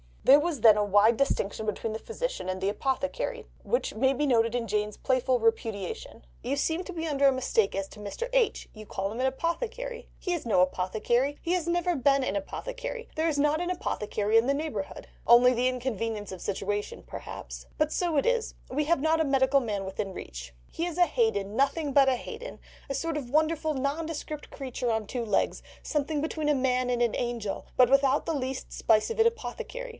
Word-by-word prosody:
There 280 +2 +8
was 305 -5 -2
then 215 -2 +8
a 210 - +3
wide 205 +3 +4
distinction 220 -6 0
between 215 +1 -2
the 220 - -4
Physician - - -4
and 185 0 -3
the 195 - +1
Apothecary, 275 - -2 0.2
which - - 0
may 265 +5 +2
be 295 +3 0
noticed 230 -3 +2
in 235 -2 -1
Jane's 210 0 -1
playful 255 -1 +1
repudiation: 220 - -2 0.2
"You 275 - -1
seem 320 +5 0
to 370 - -7
be 330 -1 -3
under 280 -2 +3
a - - +6
mistake 255 -5 +1
as 195 0 -2
to - - -13
Mr. 210 - -4
H. - - +2
you 215 -1 -10
call 195 0 -3
him 225 - -6
an 260 - +1
apothecary. 470 - -3
He 360 - -2
is 340 - -3
no 210 -6 +3
apothecary, 215 +10 +1
he 345 - -1
has 350 -2 0
never 350 0 +1
been 275 0 +3
an - - -1
apothecary; - - -5
there 320 +1 +1
is 305 -3 0
not 295 +3 +2
an 355 - -2
apothecary 215 - 0
in 225 +2 +4
the 275 - +3
neighbourhood—the 280 -10 -4 0.2
only 250 +1 +6
inconvenience 230 -5 -2
of 185 - -7
the - - -9
situation 205 +1 -3
perhaps—but 305 0 -5
so 345 -3 0
it 280 - +2
is, 475 -2 0
we 295 +3 0
have 325 -2 +2
not 320 +1 +3
a - - +2
medical 270 0 +3
man 210 -6 -3
within 195 0 -4
reach. - - -8 0.2
He 335 - -2
is 350 -1 -4
a 355 - +6
Haden, 220 -6 0
nothing 280 +3 +1
but 275 -1 +6
a 260 - +2
Haden, 485 - -8 0.3
a 275 - -1
sort 330 +1 -2
of 265 -5 -5
wonderful 315 +2 +1
nondescript 300 +2 -3
creature 255 -3 -3
on 220 -1 -1
two 235 +2 -3
legs, 210 -3 0 0.2
something 295 0 -1
between 310 -1 -1
a 295 - +4
man 255 -1 +1
and 245 -1 0
an 235 -2 +2
angel, 235 -4 -3
but 250 -2 +6
without 275 0 +3
the 330 - -1
least 260 -1 -4
spice 215 -1 +2
of 460 - -5
an 450 - +7
apothecary. 485 +2 -5
265 Hz, 205 wpm, -28 LUFS, 220-315 Hz, 0.3 s, There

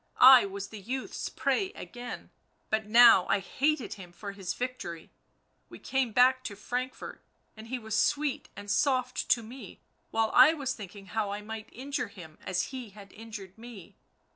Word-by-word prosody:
44 255 - +8
I 255 -5 +9
was 200 0 -6
the 215 - -9
youth's 255 +7 -4
prey 275 +9 0
again, 245 - -8 0.4
but 220 0 0
now 230 -4 +7
I - - +3
hated 270 - -1
him 185 -3 -11
for 200 +3 -7
his 195 -2 -5
victory... 245 -10 -5 0.6
we - - -11
came 265 -3 -1
back 255 +3 +4
to 205 - -5
Frankfort, 250 +5 -5 0.3
and 220 0 -11
he 255 +2 -3
was 220 -2 -4
sweet 290 +3 0
and 205 0 -6
soft 255 -1 0
to 235 - +3
me, 230 -3 -11 0.3
while 225 0 +1
I 315 - +8
was 270 -4 -2
thinking 200 -2 -10
how 215 +1 -2
I 205 +1 -5
might 220 0 -7
injure 280 +3 -4
him 160 -6 -13
as 185 +4 -2
he 255 -4 -7
had 200 0 -14
injured 215 -3 -10
me 230 -6 -11
225 Hz, 175 wpm, -29 LUFS, 200-255 Hz, 0.6 s, I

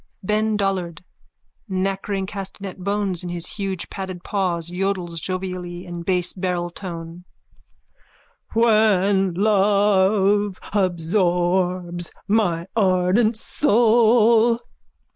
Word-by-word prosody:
_ - - -11
BEN 215 0 +1
DOLLARD: 185 -4 -2 0.7
(Nakkering 195 +1 -2
castanet 195 -1 -7
bones 200 -2 -1
in 180 - -6
his 175 -1 -3
huge 195 -2 -3
padded 185 -2 -6
paws, 175 -4 -1
yodels 180 -2 -2
jovially 180 -1 -5
in 175 -1 -6
base 180 0 0
barreltone.) 175 -2 -5 1.3
When 205 -5 +3
love 200 0 +3 0.2
absorbs 175 -1 0 0.2
my 180 -6 +1
ardent 200 +3 +2
soul. 230 -1 +4
190 Hz, 85 wpm, -22 LUFS, 180-205 Hz, 1.3 s, soul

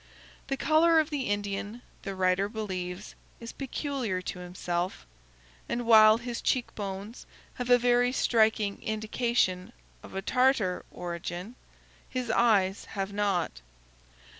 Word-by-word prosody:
The 275 0 -2
color 320 +3 +4
of 310 0 0
the 275 -7 -2
Indian, 205 +3 -3 0.2
the 195 -1 -5
writer 185 +1 +1
believes, 190 -3 -5 0.3
is 230 0 -7
peculiar 265 -7 -3
to 180 - -5
himself, 180 - -3 0.6
and 240 0 -2
while 220 -1 +8
his 235 0 -5
cheek 255 -2 0
bones 200 +2 -6 0.3
have 245 -1 -5
a 245 - +7
very 245 0 +3
striking 220 -5 +2
indication 215 -3 0 0.3
of - - -12
a 195 - -3
Tartar 250 -6 +2
origin, 175 +4 -6 0.6
his 250 -3 -2
eyes 205 -5 +3
have 195 0 -4
not. 195 - -1
215 Hz, 125 wpm, -28 LUFS, 190-245 Hz, 0.6 s, while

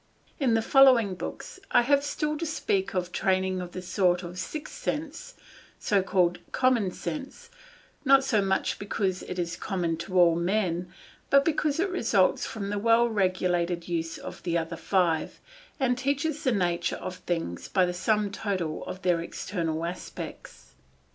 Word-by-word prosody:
In 255 -6 +3
the 225 - +1
following 255 -6 +6
books 185 - -7
I 245 - +5
have 280 +2 +3
still 300 +1 -1
to 335 - -2
speak 195 -11 -1
of 180 -1 +1
the 180 - -16
training 185 0 0
of 175 -1 -8
a 185 - -5
sort 180 -1 +1
of 175 +1 -7
sixth 305 +10 -5
sense, 325 - -4 0.7
called 180 -2 +2
common 255 -6 +2
sense, 300 - -7 0.5
not 270 -1 +6
so 225 -6 +2
much 190 -1 0
because 195 -2 -1
it 180 - -6
is 170 -1 -2
common 175 -4 -2
to 185 +2 -1
all 170 -2 +6
men, 175 -1 -1 0.4
but 275 0 +5
because 305 -2 +1
it 380 +2 +1
results 220 - +2
from 200 -2 -5
the 205 - -1
well 230 +2 +4
regulated 180 -4 0
use 165 -1 -2
of - - -9
the 170 -1 0
other 165 0 -3
five, 170 -3 0 0.4
and 250 -2 +1
teaches 285 +3 -1
the 260 - +2
nature 175 -5 0
of 185 0 -6
things 165 - -3
by 185 -2 +3
the 180 - -2
sum 210 +3 +1
total 185 -6 -3
of 185 - -7
their 175 -2 +2
external 165 -2 -3
aspects. 175 - -8
190 Hz, 165 wpm, -27 LUFS, 175-255 Hz, 0.7 s, following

